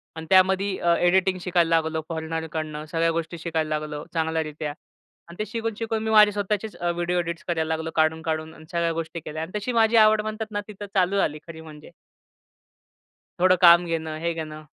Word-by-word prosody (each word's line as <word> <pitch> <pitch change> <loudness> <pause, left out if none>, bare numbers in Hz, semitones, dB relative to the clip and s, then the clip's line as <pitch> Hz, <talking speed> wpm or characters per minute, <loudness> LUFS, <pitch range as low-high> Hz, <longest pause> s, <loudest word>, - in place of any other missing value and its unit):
आणि 160 0 -7
त्यामध्ये 190 +1 +3
अ, 170 0 +3
एडिटिंग 185 +1 +3
शिकायला 175 -2 +1
लागलो 160 0 0
फॉरेनरकडनं. 160 -1 -4
सगळ्या 165 0 +2
गोष्टी 165 +1 -3
शिकायला 160 -1 -2
लागलो 150 -1 -6
चांगल्यारीत्या 160 -2 -2 0.6
आणि 170 - -12
ते 215 - -1
शिकून, 225 +1 -3
शिकून 225 -1 -2
मी 220 - -2
माझे 210 -1 +7
स्वतःचेच 205 +1 -3
अ, 175 0 -1
व्हिडिओ 175 +1 -1
एडिट्स 170 +1 -4
करायला 160 -2 -1
लागलो 160 0 -5
काढून-काढून 160 0 0
आणि 155 - -15
सगळ्या 170 -1 0
गोष्टी 165 +1 -4
केल्या. 155 0 -6
आणि 165 - -8
तशी 210 +4 -3
माझी 225 -1 +3
आवड 215 -1 +6
म्हणतात 215 0 -5
ना 205 0 -2
तिथं 205 -1 -8
चालू 190 +1 +2
झाली 155 -5 0
खरी 160 -1 -9
म्हणजे. 155 -2 -13 1.5
थोडं 185 +1 +5
काम 170 0 +8
घेणं, 160 -2 -3
हे 170 +1 -1
घेणं. 155 -1 -7
170 Hz, 185 wpm, -24 LUFS, 160-190 Hz, 1.5 s, काम